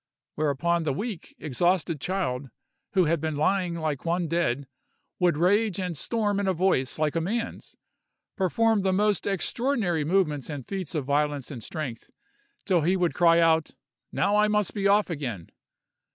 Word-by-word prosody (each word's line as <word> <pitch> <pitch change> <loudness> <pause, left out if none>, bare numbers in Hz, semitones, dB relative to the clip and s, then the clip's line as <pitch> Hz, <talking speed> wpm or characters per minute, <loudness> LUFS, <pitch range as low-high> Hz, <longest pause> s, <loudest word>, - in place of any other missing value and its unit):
Whereupon 155 +3 0
the 150 -4 -1
weak, 205 - -5
exhausted 165 +1 0
child, 145 -9 -2 0.4
who 185 -3 +4
had 160 -1 +1
been 160 -1 -2
lying 175 +3 +1
like 155 -4 -3
one 170 +1 0
dead, 150 -5 0 0.5
would 175 -4 +3
rage 200 +3 +2
and 180 -3 -3
storm 205 - 0
in 200 - -1
a 190 - +1
voice 165 -7 +1
like 155 0 0
a 165 - +1
man's, 230 +7 -4 0.6
perform 220 +3 +2
the 190 -1 +1
most 205 +1 +1
extraordinary 200 - 0
movements 155 -4 0
and 145 -5 -6
feats 190 -5 -4
of 150 -4 -1
violence 145 -1 0
and 125 -5 -7
strength, 135 -7 -6 0.6
till 180 -3 +3
he 180 +5 +2
would 175 -2 +1
cry 170 -1 +5
out, 160 -1 +2 0.4
"Now 200 +2 +1
I 210 0 +4
must 210 -3 0
be 200 -2 0
off 205 -1 +3
again!" 120 - -5
170 Hz, 165 wpm, -26 LUFS, 150-195 Hz, 0.6 s, cry